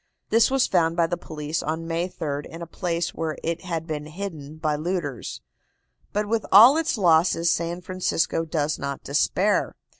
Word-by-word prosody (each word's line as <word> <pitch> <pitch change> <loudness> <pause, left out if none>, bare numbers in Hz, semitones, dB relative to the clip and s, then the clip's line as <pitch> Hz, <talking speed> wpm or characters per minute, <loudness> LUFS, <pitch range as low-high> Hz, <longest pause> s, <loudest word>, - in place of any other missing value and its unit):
This 225 0 +5
was 270 -1 +3
found 165 -2 +1
by 170 - +4
the 170 +1 -1
police 155 -1 -4
on 160 +2 -3
May 170 +2 -1
3d 145 -4 -4
in 165 +1 -8
a - - -5
place 170 +1 -2
where 160 -2 -3
it 165 +1 -2
had 165 -3 -4
been 150 -2 -5
hidden 155 -4 -7
by 155 -1 0
looters. 155 -5 -4 0.7
But 210 0 -1
with 225 0 0
all 230 +8 +9
its 320 -5 0
losses 170 -2 +3
San 170 +1 -2
Francisco 180 -3 -1
does 155 -2 -1
not 140 -1 -4
despair. 185 +8 +1
165 Hz, 175 wpm, -24 LUFS, 155-185 Hz, 0.7 s, all